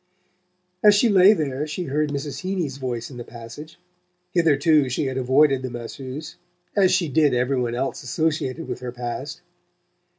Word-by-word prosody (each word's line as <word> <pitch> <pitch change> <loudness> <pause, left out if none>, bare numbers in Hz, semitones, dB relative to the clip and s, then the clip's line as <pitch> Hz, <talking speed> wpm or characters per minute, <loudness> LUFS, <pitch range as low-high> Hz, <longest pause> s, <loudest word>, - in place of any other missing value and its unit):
As 210 -1 +7
she 230 +3 +4
lay 195 0 +7
there 150 -5 -2
she 155 +4 -4
heard 150 0 -1
Mrs. 140 0 -4
Heeny's 180 -8 -3
voice 125 -2 -4
in 125 - -10
the 120 - -6
passage. 120 +7 -11 0.5
Hitherto 155 -4 +3
she 130 +4 -1
had 130 -1 -3
avoided 135 +1 +3
the 130 - -4
masseuse, 130 +5 -7 0.4
as 190 -3 +4
she 185 -2 +2
did 145 -2 +3
every 125 +1 +1
one 120 -1 -2
else 135 +2 -2
associated 155 +2 -2
with - - -4
her 125 -1 -5
past. 125 +6 -6
140 Hz, 165 wpm, -23 LUFS, 130-160 Hz, 0.5 s, As